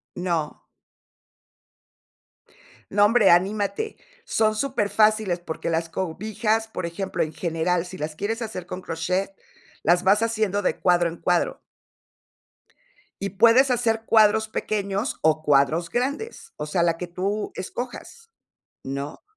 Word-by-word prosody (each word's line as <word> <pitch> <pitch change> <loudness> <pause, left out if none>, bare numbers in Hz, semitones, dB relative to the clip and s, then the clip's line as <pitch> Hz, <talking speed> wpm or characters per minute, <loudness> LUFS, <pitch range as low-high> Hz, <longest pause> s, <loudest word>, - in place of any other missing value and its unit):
No. 170 -4 -2 2.3
No, 205 +1 +3
hombre, 215 -1 +5
anímate, 205 - +1 0.3
son 215 - +1
superfáciles 215 -5 +1
porque 165 -1 -4
las 165 0 -1
cobijas, 215 +6 -1
por 185 - -4
ejemplo, 185 +3 -3
en 155 - -5
general, 170 +1 -1
si 185 +1 -9
las 155 -1 -4
quieres 225 +7 -3
hacer 210 -6 -5
con 180 +1 -6
crochet, 180 +3 -2 0.5
las 175 +1 +3
vas 200 +3 +4
haciendo 220 -3 0
de 185 - 0
cuadro 175 -1 +3
en 165 - -9
cuadro 175 0 0 1.6
y 200 -1 -3
puedes 230 +6 +5
hacer 225 -2 +1
cuadros 220 0 +4
pequeños 205 +1 -2
o 155 0 +3
cuadros 150 +3 +2
grandes, 300 - -3
o - - -4
sea, 170 +3 +1
la 170 -1 +1
que 180 - -5
tú 195 +5 -3
escojas, 255 - -7 0.5
¿no? 140 +2 -5
195 Hz, 125 wpm, -24 LUFS, 170-220 Hz, 2.3 s, hombre